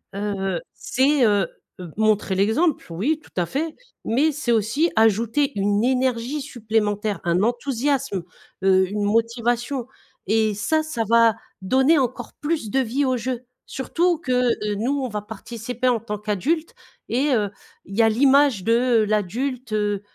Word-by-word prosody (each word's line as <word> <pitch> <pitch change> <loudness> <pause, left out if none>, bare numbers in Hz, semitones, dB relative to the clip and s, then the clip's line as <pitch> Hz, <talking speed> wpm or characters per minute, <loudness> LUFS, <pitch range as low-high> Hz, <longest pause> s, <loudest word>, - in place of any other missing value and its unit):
heu, 195 -3 -2
c'est, 270 +1 +2
heu, 205 -4 +2 0.3
heu, 175 -3 -8
montrer 215 -3 +2
l'exemple, 225 - +1
oui, 250 - 0
tout - - -20
à - - 0
fait, 310 - -3 0.3
mais 280 +8 +2
c'est 275 -4 -2
aussi 235 +10 +1
ajouter 225 +6 +2
une 205 +2 +1
énergie 255 +2 0
supplémentaire, 215 -5 -1
un 175 +1 +2
enthousiasme, 250 -2 -1 0.4
heu 190 -1 +4
une 205 +1 -2
motivation 235 +4 0 0.4
et 220 +1 +2
ça, 310 +11 0
ça 310 -7 -2
va 230 -1 +5 0.3
donner 265 - +3
encore 255 -3 -2
plus 295 -6 -1
de 270 - +2
vie 265 +3 0
au 260 -1 +1
jeu. 250 +1 -4 0.2
Surtout 340 +6 0
que, 270 -6 -4 0.2
heu, 210 -2 -2
nous, 270 +7 0
on 255 - -2
va 210 -1 -4
participer 230 +4 -5
en 240 -2 +2
tant 210 -1 -5
qu'adultes 240 - -1 0.4
et 265 +5 +1
heu, 205 -3 0 0.3
il 195 - -9
y - - +5
a 225 - +5
l'image 270 -2 +4
de 230 +1 +3
l'adulte, 235 +4 -2
heu, 205 -2 0
230 Hz, 155 wpm, -22 LUFS, 210-265 Hz, 0.4 s, va